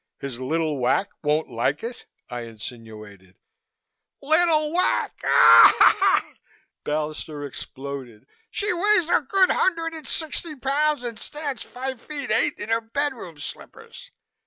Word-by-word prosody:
"His 135 -3 -6
little 155 +2 -1
Wac 130 +10 +1
won't 150 +1 0
like 130 +5 -2
it?" 235 +1 -7 0.2
I 120 -1 -6
insinuated. 110 -4 -10 0.8
"Little 310 0 +2
Wac!" 360 +2 +1 1.7
Ballister 150 0 -4
exploded. 135 -5 -8 0.2
"She 410 -2 -1
weighs 365 -1 +2
a - - +4
good 390 -3 +2
hundred 330 -3 0
and 320 -1 -8
sixty 315 0 -2
pounds 285 +1 0
and 230 -3 -5
stands 295 -3 -5
five 260 -1 -6
feet 285 -6 -6
eight 225 +6 +1
in 210 - -7
her 225 0 +1
bedroom 230 - -4
slippers. 145 - -10
225 Hz, 120 wpm, -24 LUFS, -, 1.7 s, a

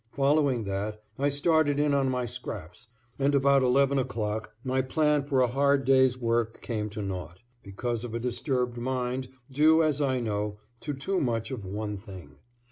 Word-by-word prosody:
Following 140 -3 +2
that 105 +2 -4 0.2
I 140 +1 +2
started 145 0 +2
in 145 -1 +2
on 135 -1 +2
my 125 -1 -1
scraps 90 -1 -7 0.3
and 140 +1 +2
about 140 0 +4
11 135 +2 +3
o'clock 110 -4 -3
my 130 0 +1
plan 150 +2 +2
for 135 -3 +2
a 125 - +4
hard 140 +2 +2
day's 130 -1 +4
work 115 -2 0
came 105 -3 -3
to 105 0 -5
naught, 90 -2 -5 0.2
because 115 +4 -4
of 120 -2 -5
a - - -1
disturbed 125 0 -1
mind 130 +1 -2 0.2
due, 155 +4 +5
as 150 -2 +1
I 130 -3 +1
know, 105 -2 -2 0.2
to 145 +2 -4
too 185 +8 -1
much 115 -3 -1
of 115 -7 -5
one 105 +2 -4
thing. 95 - -12
125 Hz, 175 wpm, -28 LUFS, 110-140 Hz, 0.3 s, due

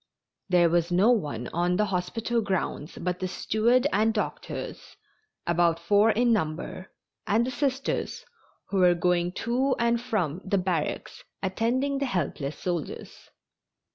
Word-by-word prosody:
There 175 -2 +5
was 170 0 +1
no 195 +7 +5
one 145 - -1
on 175 +1 +1
the 210 +3 +2
hospital 225 +6 -1
grounds 190 -6 -3
but 180 +1 -2
the 185 - -2
steward 230 +7 +2
and 220 +2 +3
doctors, 210 - -5 0.5
about 170 -1 +2
four 205 +6 +4
in 235 +2 +3
number, 175 0 -3 0.4
and 225 +3 +3
the 255 - -3
Sisters, 275 - -2 0.4
who 200 - -1
were 180 -1 +5
going 175 0 +1
to 255 +3 +2
and 235 0 +1
from 190 - -1
the 200 +1 0
barracks 180 -5 -2 0.2
attending 250 +8 0
the 275 - 0
helpless 155 - -2
soldiers. 175 -5 -5
190 Hz, 140 wpm, -27 LUFS, 175-235 Hz, 0.5 s, There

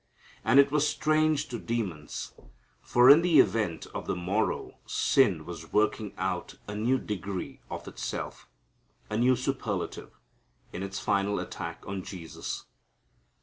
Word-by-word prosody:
And 140 - +5
it 140 0 +6
was 150 0 +3
strange 155 -1 +2
to 120 -2 -4
demons, 95 -11 -4 0.5
for 125 +1 +4
in 145 +4 +10
the 170 -4 +5
event 105 -10 +2
of - - -5
the - - 0
morrow 95 +5 -1
sin 95 - +3
was 85 -2 -8
working 105 -1 +1
out - - -3
a 105 - -5
new 120 +5 +2
degree 100 -4 -5
of - - -6
itself, - - -5 0.6
a 105 - 0
new 125 +2 +4
superlative, 125 -7 -3 0.6
in 90 - -4
its 95 0 -4
final 100 +1 +1
attack - - -6
on 95 -1 -4
Jesus. 90 -3 -6
105 Hz, 140 wpm, -29 LUFS, 95-130 Hz, 0.6 s, in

